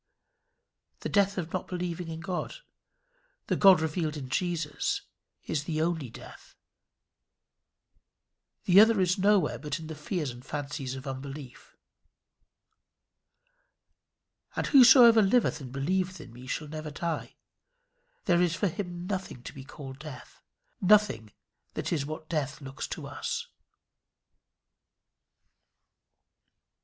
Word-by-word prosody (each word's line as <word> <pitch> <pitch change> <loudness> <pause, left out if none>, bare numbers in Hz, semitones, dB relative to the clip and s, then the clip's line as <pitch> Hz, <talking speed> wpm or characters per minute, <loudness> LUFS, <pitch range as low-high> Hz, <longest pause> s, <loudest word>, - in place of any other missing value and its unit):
The - - -3
death 200 -1 +2
of 170 -3 -4
not 185 - -2
believing 180 -1 -4
in 165 0 -6
God 180 0 -4 0.9
the - - 0
God 190 -4 +7
revealed 155 -1 -1
in 130 -3 -7
Jesus 165 0 -1 0.4
is 145 -2 -2
the 155 -2 -2
only 160 -5 -1
death. - - -13 2.1
The 185 +2 +6
other 220 0 +6
is 185 +1 +2
nowhere 200 0 +3
but 150 0 -3
in 160 - -8
the 160 - -6
fears 150 -2 -3
and 120 +1 -12
fancies 140 -2 -4
of 130 +1 -8
unbelief. 135 0 -8 2.8
"And - - -1
whosoever 240 -4 +8
liveth 210 -4 +2
and 130 -2 -8
believeth 185 +7 -1
in 125 -6 -11
me 125 +2 -11
shall 150 +3 -3
never 155 0 -6
die." 165 +3 -4 0.9
There 175 -3 +4
is 175 -2 +2
for 200 +2 +1
him 175 0 -5
nothing 185 -10 -4
to - - -8
be 135 - -9
called 135 -1 -10
death; 150 -4 -11 0.4
nothing 195 - +3 0.4
that - - -2
is 145 -4 -1
what 155 +1 -7
death 150 -4 -2
looks 135 -1 -6
to - - -6
us. 475 -1 -4
160 Hz, 125 wpm, -29 LUFS, 140-185 Hz, 2.8 s, whosoever